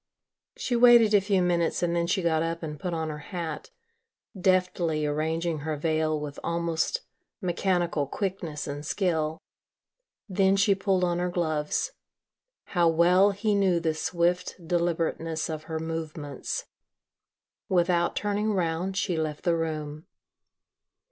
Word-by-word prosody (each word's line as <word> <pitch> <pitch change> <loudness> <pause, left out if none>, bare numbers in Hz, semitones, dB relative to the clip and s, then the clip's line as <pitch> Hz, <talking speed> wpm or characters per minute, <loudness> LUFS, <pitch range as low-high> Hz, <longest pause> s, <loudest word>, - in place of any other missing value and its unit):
She 245 - -1
waited 235 -2 +7
a 205 - +6
few 195 -2 +2
minutes 175 -1 +1
and 170 0 +1
then 170 0 +1
she 185 +1 0
got 160 -2 +2
up 165 +1 -2
and 150 -2 -5
put 180 - -3
on 160 -1 -2
her 150 - -6
hat, 170 -4 -5 0.7
deftly 180 -4 +1
arranging 160 +2 -1
her 155 +1 -3
veil 155 0 0
with 145 -1 -6
almost 170 - -1 0.4
mechanical 175 -5 0
quickness 180 -3 -3
and 145 0 -5
skill. 160 -2 0 0.9
Then 195 0 +3
she 200 +1 +4
pulled 195 -1 +1
on 175 -1 +1
her 180 0 0
gloves. 160 - -1 0.8
How 175 -2 +4
well 180 +4 +5
he 205 +2 0
knew 190 -4 +3
the 160 -1 0
swift 175 +2 0
deliberateness 165 -2 -1
of 155 0 -6
her 160 - -4
movements. 160 -3 -4 1.0
Without 175 -1 +2
turning 210 +1 0
round 180 +1 -1
she 185 -3 0
left 155 -2 -3
the 170 -2 +2
room. 155 -2 -4
170 Hz, 135 wpm, -27 LUFS, 160-185 Hz, 1.0 s, waited